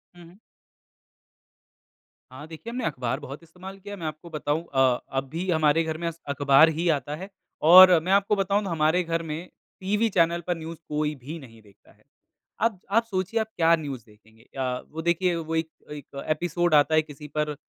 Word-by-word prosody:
हुँ, 175 - -14
हुँ। 175 +4 -17 1.9
हाँ। 145 +4 -10
देखिए 165 +9 -9
हमने 245 -1 -3
अख़बार 130 -2 -2
बहुत 140 +5 -9
इस्तेमाल 185 +4 -11
किया 205 +1 -9
है। 200 - -8
मैं 160 - -4
आपको 155 +3 -8
बताऊँ 155 0 -2
अ, 130 -2 +3
अब 135 0 -2
भी 175 +5 -4
हमारे 160 -1 +3
घर 160 -1 -3
में 170 0 -3
अस 165 0 -6
अख़बार 140 +2 +5
ही 175 - 0
आता 145 +1 -6
है 190 +5 -8 0.4
और 185 -2 +10
मैं 185 - -2
आपको 200 +1 +3
बताऊँ 200 +1 0
तो 195 - -4
हमारे 160 +2 +2
घर 165 0 -2
में, 160 +3 -6 0.3
टीवी 210 +4 +1
चैनल 170 -2 +2
पर 175 -1 0
न्यूज़ 165 +1 -8
कोई 150 0 -1
भी 145 +5 -8
नहीं 115 -5 -15
देखता 100 -2 -23
है। - - -27 0.6
अब 225 -4 +1
आप 230 +3 +4
सोचिए 200 +1 -2
आप 220 - -1
क्या 165 0 +5
न्यूज़ 140 -7 -6
देखेंगे 110 +1 -22
अ, 125 -1 -2
वो 160 +2 -5
देखिए 170 +1 +1
वो 165 -1 -4
एक 160 0 -1 0.2
एक 140 -1 -8
एपिसोड 175 +1 0
आता 150 +2 +4
है 155 - +5
किसी 150 -1 -11
पर, 150 -1 -1
160 Hz, 200 wpm, -25 LUFS, 145-180 Hz, 1.9 s, और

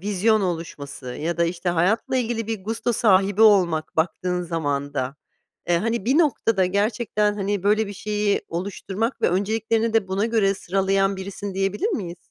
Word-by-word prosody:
vizyon 210 +3 +2
oluşması 150 -7 -5
ya 155 +7 -3
da 170 - +2
işte, 170 +1 -2
hayatla 180 +9 +1
ilgili 230 -2 -1
bir 220 -4 -4
gusto 230 +2 -1
sahibi 200 -1 +3
olmak 175 -8 +4
baktığın 180 +2 0
zaman 145 -4 -2
da. 130 +1 -2 0.5
Eee, 170 -1 +3
hani, 230 +1 -1
bir 265 +7 +3
noktada 225 - +2
gerçekten, 210 +1 0
hani, 200 -1 -2
böyle 210 +2 +2
bir 200 - -6
şeyi 210 0 -1
oluşturmak 200 +6 -3
ve - - +4
önceliklerini 220 +4 0
de 220 -4 +1
buna 195 +4 0
göre 210 -4 +2
sıralayan 195 +1 0
birisin, 195 0 -6
diyebilir 195 - 0
miyiz? 180 - -3
195 Hz, 160 wpm, -23 LUFS, 175-220 Hz, 0.5 s, olmak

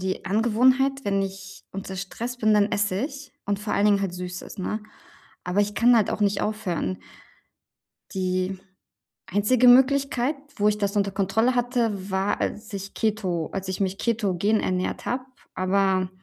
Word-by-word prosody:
die 185 -1 -3
Angewohnheit, 255 +6 +3
wenn 195 -1 +1
ich 195 0 -7
unter 195 0 -6
Stress 230 +6 -5
bin, 215 -2 +3
dann 210 0 +3
esse 205 -2 +1
ich 280 -1 -8
und 200 -1 0
vor 210 - -2
allen 200 - +2
Dingen 200 -1 +4
halt 185 -3 -2
Süßes, 180 +1 -7
ne? 215 +3 -3 0.6
Aber 180 +3 +1
ich 205 0 0
kann 240 +1 +5
halt 215 - +2
auch - - -3
nicht 200 -1 +2
aufhören. 180 - -2 1.2
Die 185 0 -1 0.7
einzige 210 +6 +3
Möglichkeit, 270 +1 +4 0.2
wo 210 +1 +2
ich 210 0 +2
das 200 0 -1
unter 200 -1 +1
Kontrolle 220 +6 +1
hatte, 230 -6 0
war, 190 +2 0
als 210 0 -3
ich 195 0 -6
Keto 190 -7 -1
als 195 -1 -4
ich 190 - -3
mich 195 -1 -1
ketogen 215 -2 +1
ernährt 185 0 -2
habe, 255 +1 -1 0.3
aber 185 0 +1
205 Hz, 165 wpm, -25 LUFS, 190-225 Hz, 1.2 s, kann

